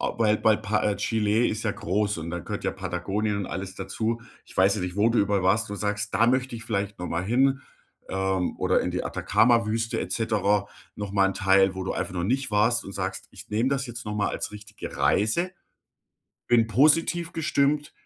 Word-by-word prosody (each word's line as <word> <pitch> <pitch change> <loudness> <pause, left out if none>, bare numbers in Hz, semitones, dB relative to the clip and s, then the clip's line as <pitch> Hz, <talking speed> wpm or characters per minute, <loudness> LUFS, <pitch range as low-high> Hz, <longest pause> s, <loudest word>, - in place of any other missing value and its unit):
äh, - - 0
weil 110 -2 +3
bei 110 -1 +4
Pa 110 -1 -1
äh, 105 -1 +1
Chile 110 +1 +1
ist 110 +1 -2
ja 110 - 0
groß 105 -1 -1
und 80 +1 -5
da 85 0 -3
gehört 100 +4 -6
ja - - 0
Patagonien 95 +3 -2
und 100 -2 -3
alles 95 0 -6
dazu. 110 +4 -2 0.2
Ich - - -16
weiß 95 +1 +4
ja 105 - -3
nicht, 90 +1 -4
wo 105 +2 +4
du 115 -2 +2
überall 100 -2 +1
warst 105 +3 +2
und 100 - -4
sagst: 105 +1 -2
„Da 115 - +4
möchte 130 -1 +1
ich 115 - -9
vielleicht 100 -3 -2
noch 90 - -4
mal 85 +1 -2
hin, 135 +5 +2 0.5
ähm, 95 -1 -1
oder - - +2
in - - -2
die - - -3
Atacama-Wüste 115 -1 +2
et - - -4
cetera.“ 105 -3 +1 0.3
Noch 100 -1 -5
mal 100 -1 +4
'n 95 - -4
Teil, 95 0 +4
wo 95 - -4
du - - -2
einfach 90 - -4
noch 85 -1 -1
nicht 130 +5 0
warst 105 +3 +2
und 100 - -8
sagst: - - -4
„Ich - - -13
nehme 115 +5 +1
das 140 0 -1
jetzt 120 -1 -7
noch 105 0 -4
mal 105 - +1
als - - -4
richtige 105 0 -9
Reise, 170 - +1 1.0
bin 115 -2 +4
positiv 160 - +3
gestimmt 150 -1 +1
105 Hz, 215 wpm, -26 LUFS, 95-115 Hz, 1.0 s, bei